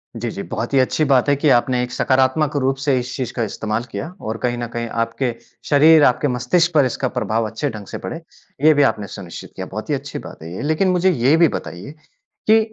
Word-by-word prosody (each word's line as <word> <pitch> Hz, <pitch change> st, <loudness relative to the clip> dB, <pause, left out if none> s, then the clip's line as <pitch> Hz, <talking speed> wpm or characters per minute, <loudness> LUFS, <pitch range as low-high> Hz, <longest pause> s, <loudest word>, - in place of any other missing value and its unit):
जी, 115 Hz, +1 st, -3 dB
जी। 100 Hz, -, -6 dB
बहुत 120 Hz, +4 st, -4 dB
ही 135 Hz, -, +5 dB
अच्छी 130 Hz, +4 st, +1 dB
बात 135 Hz, 0 st, +3 dB
है 145 Hz, -, +4 dB
कि 145 Hz, +1 st, +1 dB
आपने 125 Hz, 0 st, +3 dB
एक 125 Hz, -, -5 dB
सकारात्मक 130 Hz, +3 st, +1 dB
रूप 135 Hz, 0 st, +1 dB
से 140 Hz, -3 st, +2 dB
इस 125 Hz, +1 st, -5 dB
चीज़ 130 Hz, -3 st, -4 dB
का 120 Hz, -, -1 dB
इस्तेमाल 110 Hz, +2 st, -3 dB
किया। 100 Hz, +6 st, -4 dB
और 110 Hz, +1 st, -4 dB
कहीं 120 Hz, -1 st, 0 dB
न 120 Hz, -1 st, -3 dB
कहीं 120 Hz, 0 st, -3 dB, 0.2 s
आपके 115 Hz, +1 st, -3 dB, 0.3 s
शरीर 155 Hz, +1 st, +6 dB
आपके 130 Hz, +4 st, +3 dB
मस्तिष्क 150 Hz, +8 st, +1 dB
पर 145 Hz, -4 st, +5 dB
इसका 130 Hz, +1 st, -1 dB
प्रभाव 110 Hz, 0 st, -1 dB
अच्छे 125 Hz, +6 st, -3 dB
ढंग 105 Hz, -4 st, -8 dB
से -, -, -6 dB
पड़े। 165 Hz, -, -5 dB, 0.4 s
ये 155 Hz, -, +8 dB
भी 145 Hz, -1 st, +4 dB
आपने 105 Hz, -6 st, 0 dB
सुनिश्चित 90 Hz, -4 st, -9 dB
किया। 95 Hz, -, -5 dB
बहुत 110 Hz, +8 st, -6 dB
ही 145 Hz, -, +2 dB
अच्छी 140 Hz, +1 st, -6 dB
बात -, -, -11 dB
है 85 Hz, +2 st, -8 dB
ये। -, -, -5 dB
लेकिन 155 Hz, +6 st, +1 dB
मुझे 180 Hz, +1 st, +3 dB
ये 135 Hz, +1 st, +3 dB
भी 170 Hz, -1 st, +6 dB
बताइए 100 Hz, -, -6 dB, 0.5 s
कि 220 Hz, +1 st, +6 dB
130 Hz, 235 wpm, -20 LUFS, 115-145 Hz, 0.5 s, ये